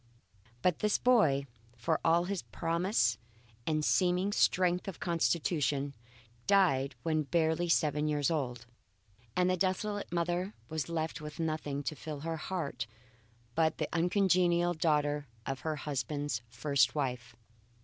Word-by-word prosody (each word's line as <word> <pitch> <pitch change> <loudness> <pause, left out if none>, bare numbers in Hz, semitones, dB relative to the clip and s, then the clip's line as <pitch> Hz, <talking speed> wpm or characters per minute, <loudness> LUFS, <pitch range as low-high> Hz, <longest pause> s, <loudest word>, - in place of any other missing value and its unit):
But 180 -3 +2
this 210 -1 +2
boy, 160 - +4 0.3
for 160 +7 0
all 170 +1 +4
his 190 0 -2
promise 165 - 0 0.5
and 155 -1 +1
seeming 180 +2 +2
strength 180 -2 +2
of 195 - -6
constitution, 150 -3 0 0.5
died 145 -10 +3
when 155 -1 +1
barely 160 +2 +1
seven 150 -2 +2
years 150 +1 +1
old, 125 -6 -2 0.7
and 180 - +3
the 185 - +3
desolate 195 +2 -1
mother 175 +3 -1
was 160 -3 -3
left 160 -1 -2
with 150 +2 -8
nothing 155 -3 -2
to 155 - -3
fill 150 -1 -6
her 165 +1 -3
heart 150 -9 -3 0.7
but 160 +4 +2
the - - -1
uncongenial 175 0 +3
daughter 150 -3 +1 0.2
of 135 -1 -3
her 155 +3 -2
husband's 145 -3 -2
first 130 +3 +2
wife. 125 -4 -3
160 Hz, 130 wpm, -32 LUFS, 145-175 Hz, 0.7 s, boy